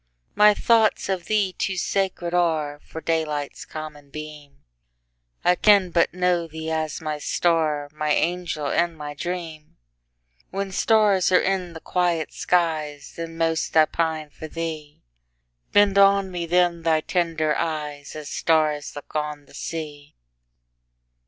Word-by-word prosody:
My 210 0 +6
thoughts 225 -3 +3
of 185 -3 -2
thee 205 -3 +1
too 190 0 -2
sacred 185 -2 -1
areFor 160 -3 -1
daylight's 150 -3 -2
common 150 -2 -8
beam:I - - -6
can 195 -1 +4
but 170 -1 +3
know 180 -2 +1
thee 160 0 -6
as 160 -1 -2
my 155 -1 -3
star, 155 -3 +1
My 150 0 -2
angel 170 -1 0
and 170 +3 0
my 150 -1 -6
dream; 165 -1 -6 0.7
When 195 0 -3
stars 205 -2 +3
are 180 - +6
in 185 -3 -1
the 160 - -8
quiet 175 -2 -1
skies, 155 -5 -1
Then 165 0 -6
most 165 -1 0
I 155 - +8
pine 160 -2 -2
for 155 - -9
thee; 155 -2 -6 0.7
Bend 205 -1 +5
on 195 -1 +5
me 175 -2 -4
then 175 0 +2
thy 160 -1 +2
tender 160 -3 0
eyes, 150 -3 -4
As 155 -1 -7
stars 155 -3 +1
look 145 - -10
on 150 -1 -3
the - - -20
sea! 150 -3 -6
160 Hz, 135 wpm, -24 LUFS, 150-180 Hz, 0.7 s, I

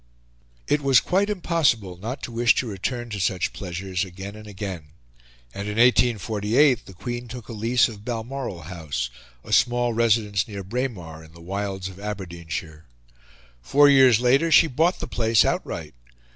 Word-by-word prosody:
It 150 - +1
was 135 -3 +5
quite 195 +3 0
impossible 155 - 0
not 110 +9 -6
to - - -5
wish 120 +1 +3
to - - 0
return 120 +3 -4
to 105 - -4
such 95 0 -1
pleasures 90 0 -4
again 95 +2 -8
and 110 0 -11
again; 95 -5 -6 0.7
and 100 +1 -5
in 105 - -3
1848 120 +1 +3
the 95 - -12
Queen 120 +5 -5
took 120 0 -9
a 115 - -7
lease 115 +3 +2
of 105 -3 -10
Balmoral 120 -5 -5
House, 75 -8 -4 0.3
a - - -5
small 120 0 +3
residence 110 -3 +1
near 100 -3 -7
Braemar 95 -8 -4
in 80 0 -17
the 85 - -15
wilds 95 +1 -4
of 95 0 -11
Aberdeenshire. 85 -6 -6 0.8
Four 145 - +5
years 130 -5 +6
later 135 +7 +3
she 165 - +7
bought 165 +5 +1
the - - -4
place 115 -2 +3
outright. 75 -4 -3
110 Hz, 160 wpm, -24 LUFS, 95-125 Hz, 0.8 s, she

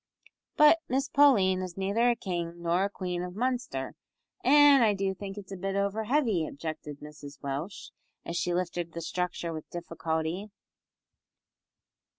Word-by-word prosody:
"But 300 +2 +7
Miss 270 +2 0
Pauline 200 -11 +5
is 185 -1 -6
neither 200 +5 +2
a 240 - +3
king 175 -4 -4
nor 170 +2 +2
a - - -1
queen 180 -3 -4
of 180 0 -6
Munster, 240 - -2 0.5
an' 290 0 +7
I 215 -3 +4
do 195 0 -1
think 195 +1 -7
it's 200 -1 -9
a - - -4
bit 195 +1 -3
over 200 +2 0
heavy," 235 - +2
objected 150 -1 -6
Mrs 145 -1 -11
Welsh, 140 +8 -5 0.3
as 170 - -4
she 175 - 0
lifted 175 -1 -2
the 170 - -5
structure 175 0 -3
with 155 -1 -8
difficulty. 165 +2 -3
185 Hz, 155 wpm, -29 LUFS, 170-215 Hz, 0.5 s, But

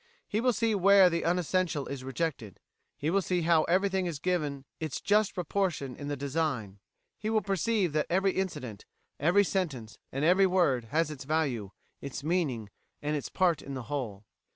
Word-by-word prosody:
He 215 - -1
will 250 +1 +3
see 225 -1 +1
where 195 -1 +6
the 170 0 0
unessential 175 -3 0
is 140 -2 -6
rejected; 130 - -3 0.4
he 155 +3 -1
will 195 +2 +3
see 180 -2 0
how 165 -1 +4
everything 190 +1 +1
is 165 -4 -3
given 145 -5 -2
its 155 -5 -3
just 210 0 +2
proportion 175 -7 -1
in 145 - -7
the 145 0 -2
design; 135 -8 -2 0.4
he 215 - -2
will 220 -2 +2
perceive 195 -2 0
that 150 0 +1
every 190 +2 +2
incident, 150 - -4 0.3
every 175 +7 +4
sentence, 150 - -3
and 135 +3 -1
every 190 +3 +5
word 165 -10 +2
has 155 +6 0
its 145 -3 -7
value, 135 -9 -1 0.3
its 140 0 -6
meaning, 145 - -1 0.3
and 150 +1 0
its 145 - -4
part 175 -5 +2
in 140 - -7
the 130 - -5
whole." 110 -8 -4
160 Hz, 175 wpm, -29 LUFS, 140-185 Hz, 0.4 s, where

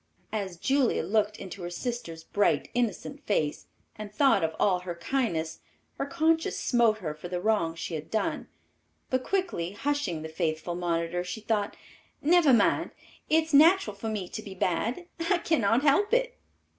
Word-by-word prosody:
As 195 -5 -3
Julia 270 - +1
looked 210 +3 +1
into 195 0 -8
her 175 - -4
sister's 175 -5 -5
bright, 205 +4 +1
innocent 245 - -2
face 155 -8 0 0.3
and 215 -1 -8
thought 270 - +3
of 160 0 -1
all 185 -3 +3
her 180 -1 -6
kindness, 170 -6 -2 0.4
her 275 - -1
conscience 325 +1 +1
smote 235 -3 +3
her 165 -8 -4
for 155 +3 -9
the 180 0 -3
wrong 180 -5 +1
she 165 - -5
had 155 -1 -5
done, 220 - -1 0.6
but 255 0 +1
quickly 345 - -1
hushing 230 - -2
the - - -4
faithful 160 +1 -2
monitor, 170 0 -1
she 220 +5 -6
thought, 210 -2 -1 0.4
"Never 325 -1 +5
mind; 230 -5 +3 0.4
it 320 +1 +4
is 315 -1 -10
natural 310 - +6
for 220 +3 -4
me 205 -4 -3
to 215 - -6
be 200 -3 -9
bad. 215 - -1 0.2
I 365 - +4
cannot 255 -8 +2
help 405 +11 +4
it." - - 0
210 Hz, 170 wpm, -28 LUFS, 175-275 Hz, 0.6 s, natural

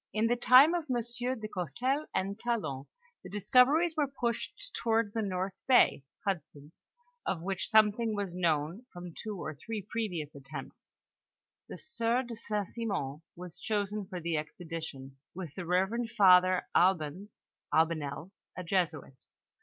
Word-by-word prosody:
In 215 +1 +2
the 240 +1 +3
time 255 +6 +7
of 345 -3 -1
M. 255 - +1 0.4
de 215 - -5
Gourcelles 245 - -2
and 195 +3 -1
Talon, 155 - -2 0.4
the - - -9
discoveries 260 - +4
were 300 -3 +2
pushed 270 - -3
toward 225 -2 +1
the 225 - 0
north 190 -1 -2
bay 255 - +5 0.2
(Hudson's), 155 -5 -5 0.3
of 170 -3 -2
which 195 +1 -2
something 220 0 +4
was 200 -3 -3
known 170 +5 0
from 175 -1 -9
two 210 +3 -6
or 155 - -4
three 210 +8 -6
previous 180 -10 -3
attempts. 140 +1 -10 0.7
The - - -7
sieur 245 -5 0
de 240 -2 -7
St. 210 -3 -2
Simon 180 - -3
was 175 0 -9
chosen 205 -1 -2
for 185 -2 -5
the 165 -1 -1
expedition, 150 -4 -6 0.2
with 175 -6 -6
the 180 -1 -6
reverend 195 +7 +1
father 185 -4 +6
Albanes 180 +2 +1 0.3
(Albanel), 160 +1 0 0.3
a 185 - -4
Jesuit. 165 -7 -2
195 Hz, 145 wpm, -31 LUFS, 165-230 Hz, 0.7 s, time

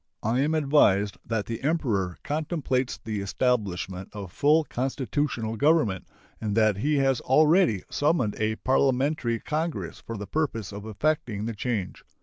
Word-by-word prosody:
I 115 +4 +1
am 150 +4 +2
advised 120 -10 +3
that 110 -3 -1
the 115 +1 -5
Emperor 120 - 0
contemplates 145 -4 -1
the 110 -3 -4
establishment 100 -4 -1
of 100 -4 -7
full 150 - +3
constitutional 130 -4 -2
government, 145 - +2 0.3
and 105 -1 -2
that 110 -3 +3
he 150 +8 +1
has 135 -2 +2
already 155 - +4
summoned 145 -8 +1
a 110 0 0
parliamentary 130 -1 +1
congress 150 - -3
for 115 - -6
the 100 - -5
purpose 115 -4 -2
of 100 +1 -8
effecting 110 -2 -1
the 115 - -3
change. 105 -3 -3
120 Hz, 140 wpm, -26 LUFS, 105-145 Hz, 0.3 s, already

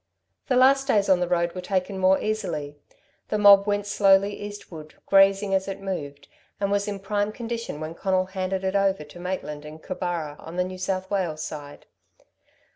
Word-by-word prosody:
The 255 - +1
last 270 +2 +5
days 205 -6 +2
on 185 -2 +5
the 180 - 0
road 170 -1 0
were 185 - -5
taken 190 +1 -2
more 190 0 +4
easily. 155 -9 -3 0.5
The 210 - 0
mob 200 -1 +7
went 205 0 0
slowly 200 0 +3
eastward, 185 -7 -9
grazing 195 0 +4
as 190 0 +1
it 195 0 -5
moved, 145 -8 -6 0.3
and 200 0 0
was 205 0 +1
in 205 -1 -3
prime 205 +1 -1
condition 230 -7 -5
when 155 +1 -5
Conal 185 +1 0
handed 190 0 -3
it 190 +1 -1
over 195 -4 +2
to 150 +3 -13
Maitland 175 -5 -4
in 150 +1 -9
Cooburra, 170 -4 -4
on 165 - -10
the 180 - +1
New 185 0 -7
South 185 +1 -3
Wales 175 -6 -1
side. 145 -2 -8
190 Hz, 185 wpm, -25 LUFS, 175-200 Hz, 0.5 s, mob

